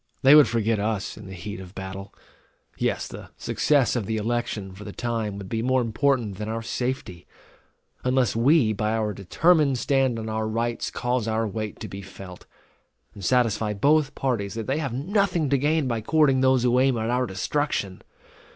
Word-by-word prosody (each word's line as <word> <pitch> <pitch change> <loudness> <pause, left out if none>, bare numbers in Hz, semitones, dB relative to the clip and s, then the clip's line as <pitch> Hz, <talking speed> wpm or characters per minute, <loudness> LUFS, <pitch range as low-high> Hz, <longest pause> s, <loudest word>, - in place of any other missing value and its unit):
They 135 +2 +8
would 150 -1 +8
forget 115 -1 0
us 105 -1 -2
in - - -11
the 95 - -8
heat 95 +2 -7
of 95 0 -11
battle; 95 +1 -7 0.6
yes, - - -1
the - - -10
success 140 -5 +1
of 110 -5 -2
the 110 - -1
election, 110 -3 -2
for 100 +2 -10
the 105 - -7
time, 115 -3 -3
would 100 -1 -7
be 110 +2 -2
more 130 +2 +2
important 115 -3 0
than 105 0 -4
our 115 0 -3
safety; 120 -7 -4 0.8
unless 125 -2 +1
we 120 -1 +4
by 105 +1 -1
our 110 -2 -1
determined 140 - +2
stand 135 -2 +1
on 110 -1 -5
our 110 0 -2
rights 115 +2 -2
cause 125 -2 -1
our 110 0 0
weight 105 +1 -5
to - - -5
be 95 - -8
felt, 95 -1 -11 0.7
and 100 - -11
satisfy 110 -2 +1
both 145 +5 +2
parties 110 -7 -2
that 115 -1 -4
they 135 +4 -1
have 140 -5 -2
nothing 175 - 0
to 140 - +4
gain 150 +1 +1
by 115 -2 -1
courting 135 +1 +3
those 130 -2 +3
who 125 0 +3
aim 130 -2 +3
at 110 +1 -1
our 125 0 +1
destruction. 100 -1 -2
115 Hz, 190 wpm, -25 LUFS, 105-130 Hz, 0.8 s, They